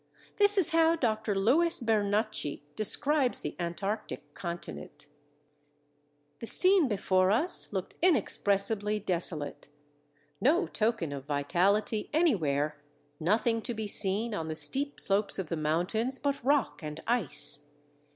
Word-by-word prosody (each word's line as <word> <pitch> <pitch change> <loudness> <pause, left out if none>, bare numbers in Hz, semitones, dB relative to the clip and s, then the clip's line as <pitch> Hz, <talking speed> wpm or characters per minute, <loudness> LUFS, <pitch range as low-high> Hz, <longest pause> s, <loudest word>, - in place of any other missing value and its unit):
This 410 0 +5
is 355 -3 +5
how 330 0 +2
Dr. 220 -7 -2
Louis 315 - +1
Bernacchi 215 - -2
describes 270 +5 0
the - - -6
Antarctic 195 +5 -6
continent: 170 - -9 1.3
"The 230 - -8
scene 370 - +3
before 190 -3 0
us 265 - +2
looked 190 -3 -5
inexpressibly 210 - +1
desolate.... 170 -6 -3 0.7
No 335 +8 +2
token 215 - -2
of 140 -1 -8
vitality 185 +9 -1
anywhere, 155 - -1 0.4
nothing 225 +7 0
to 240 - -5
be 220 0 -5
seen 205 +3 +3
on 165 -6 -5
the 155 - -5
steep 280 - 0
slopes 200 +1 +1
of 190 -5 -5
the 170 - -3
mountains 180 - -2
but 280 -2 -4
rock 280 -4 -1
and 150 0 -8
ice.... 150 - +6
210 Hz, 120 wpm, -28 LUFS, 170-255 Hz, 1.3 s, ice